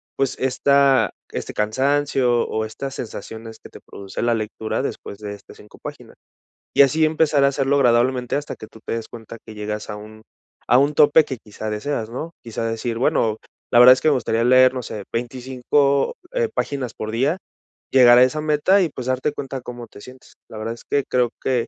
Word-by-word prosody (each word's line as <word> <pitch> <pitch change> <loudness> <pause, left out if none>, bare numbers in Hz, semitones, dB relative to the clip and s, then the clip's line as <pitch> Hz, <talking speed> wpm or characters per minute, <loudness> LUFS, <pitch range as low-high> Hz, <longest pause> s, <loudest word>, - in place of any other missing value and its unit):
pues, 135 -2 -1
esta 135 +1 +3 0.2
este - - -5
cansancio 130 +2 +1
o 110 0 -2
estas 135 +5 -6
sensaciones 110 -1 -8
que - - -13
te - - -13
produce 100 -1 -8
la 120 0 +2
lectura 110 0 -3
después 100 - -6
de 105 -1 -6
estas 100 -1 -14
5 105 - -16
páginas, - - -9 0.6
y - - +6
así 155 +3 +4
empezar 155 -2 +2
a - - +6
hacerlo 140 0 0
agradablemente 125 -1 +2
hasta 145 +1 -4
que 110 - -11
tú 110 - -16
te - - -3
des 115 -1 -4
cuenta 115 0 -10
que 110 - -10
llegas 105 0 -5
a 105 - -4
un 110 +1 -12 0.4
a 120 - +5
un 145 +2 +2
tope 150 +2 +6
que 130 - -5
quizá 110 0 -7
deseas, 110 +1 -3
¿no? 155 +8 -6
Quizá 115 0 -4
decir: 115 +1 -3
"Bueno, 110 -3 +1 0.3
la 120 - +5
verdad 125 +1 +10
es - - -3
que - - +1
me - - +4
gustaría 115 -2 0
leer, 130 +1 +5
no 130 - -4
sé, 105 -2 -7
25, 130 - 0 0.2
eh, - - 0
páginas 130 -5 -3
por 110 0 -5
día, 135 +10 0 0.5
llegar 125 -2 +7
a 125 - +8
esa 130 +4 +1
meta 155 +6 +3
y 175 - +1
pues 130 -3 -7
darte 130 +3 -1
cuenta 135 -2 -6
cómo 120 -1 -9
te 100 - -15
sientes. 130 +2 -15 0.2
La 110 - -9
verdad 110 +2 -4
es - - -16
que 140 -1 +1
creo 125 -2 +1
que 125 -3 0
125 Hz, 205 wpm, -21 LUFS, 110-140 Hz, 0.6 s, verdad